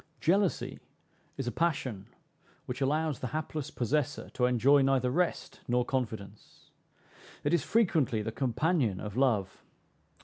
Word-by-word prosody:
Jealousy 190 +2 +1 0.6
is 135 - -3
a 120 - -1
passion 130 - -1 0.6
which 125 +2 -5
allows 150 +1 +1
the 125 - -3
hapless 155 -2 -4
possessor 145 +4 -1
to 125 - +1
enjoy 130 +4 +4
neither 135 -2 +2
rest 175 +5 -1
nor 125 0 +2
confidence. 110 -6 -5 0.7
It - - +1
is 170 - +4
frequently 160 - +2
the 110 - -3
companion 130 - 0
of 105 -1 -6
love. 115 -8 +1
130 Hz, 130 wpm, -30 LUFS, 120-155 Hz, 0.7 s, enjoy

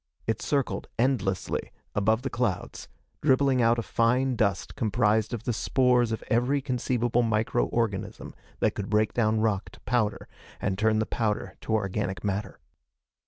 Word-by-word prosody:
It 110 - -1
circled 140 -3 -1
endlessly 115 -7 0 0.2
above 110 +4 +2
the 135 - -3
clouds, 115 -7 -2 0.3
dribbling 135 -2 +3
out 115 0 +4
a 115 - -1
fine 125 +4 +2
dust 100 -4 0
comprised 110 -1 +1
of 120 -4 -4
the 120 - -1
spores 125 0 +2
of 110 - -3
every 125 +5 +2
conceivable 125 -2 0
microorganism 115 -1 -1 0.3
that - - +3
could 100 - -5
break 105 0 +2
down 110 -2 +2
rock 105 -3 0
to - - -15
powder 110 -4 0 0.3
and 95 -1 -1
turn 110 +2 +2
the 110 - +1
powder 105 -5 -2
to 110 - 0
organic 95 -2 -2
matter. 100 -1 -3
115 Hz, 150 wpm, -27 LUFS, 105-125 Hz, 0.3 s, out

